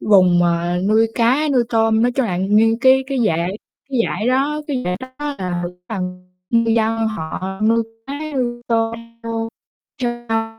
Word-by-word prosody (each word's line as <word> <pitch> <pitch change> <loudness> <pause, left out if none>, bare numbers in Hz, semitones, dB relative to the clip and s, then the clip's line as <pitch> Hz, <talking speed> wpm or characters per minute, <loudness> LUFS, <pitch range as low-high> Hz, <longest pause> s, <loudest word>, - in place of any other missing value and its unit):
vùng 185 -4 +5
mà 175 0 +1
nuôi 220 +1 +4
cá, 255 +6 +2
nuôi 250 -3 +4
tôm, 225 -1 +3
nói 245 +1 +2
chung 265 -1 0
là 180 -4 -2
nguyên 215 +4 +3
cái 265 0 +5
cái 270 -1 -2
dải 170 0 0 0.4
cái 260 -3 +1
dải 215 +3 -1
đó 280 +4 +1
cái 265 -4 -1
dải 180 0 -1
đó 260 - -7 0.3
là 180 -2 -2
cái 175 - -5 0.2
phần 180 -3 -5 0.2
ngư 230 -1 +3
dân 225 0 +2
họ 190 0 -5
nuôi 230 +1 +3 0.2
cá, 275 - -5 0.2
nuôi 240 -2 -2
tôm 225 -1 +1 0.3
vô 225 0 -3 0.5
trên 240 -1 -3
sông 225 0 -2
225 Hz, 180 wpm, -19 LUFS, 190-240 Hz, 0.5 s, vùng